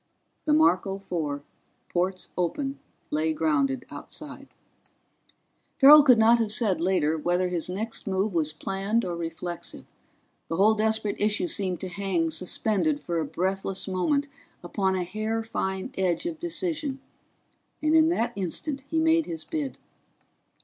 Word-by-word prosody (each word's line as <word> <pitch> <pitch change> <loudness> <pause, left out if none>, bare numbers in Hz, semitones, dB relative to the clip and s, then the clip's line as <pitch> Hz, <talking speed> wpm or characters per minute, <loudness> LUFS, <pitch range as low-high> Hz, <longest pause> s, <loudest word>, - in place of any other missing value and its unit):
The 300 - +3
Marco 195 - +3
Four, 155 -7 -4 0.4
ports 185 +1 -1
open, 270 - -2 0.3
lay 155 +1 +1
grounded 140 -5 0
outside. 280 - -7 1.3
Farrell 295 +2 +10
could 260 -5 +6
not 230 +2 +5
have 225 -2 0
said, 210 -6 +1
later, 160 -4 +1
whether 180 +3 +1
his 175 -1 -1
next 215 +5 -4
move 195 +1 0
was 155 -3 +1
planned 195 +8 -1
or 175 -1 -3
reflexive. 170 +1 -5 0.6
The 165 - -2
whole 205 +5 +5
desperate 220 -1 +1
issue 210 +10 +2
seemed 195 - -1
to 190 - -4
hang 180 -3 -1
suspended 215 - +1
for 170 - -2
a 160 - -1
breathless 190 +5 -2
moment 280 +11 0 0.4
upon 190 +2 0
a 185 - -1
hair 215 +5 -3
fine 190 -4 -3
edge 185 - 0
of 330 -2 -4
decision, 325 -5 -2 0.8
and 310 0 +1
in 320 0 +6
that 240 -9 0
instant 265 - -3
he 325 - +1
made 325 0 +3
his 165 -2 -5
bid. 290 - -4
195 Hz, 140 wpm, -26 LUFS, 175-265 Hz, 1.3 s, Farrell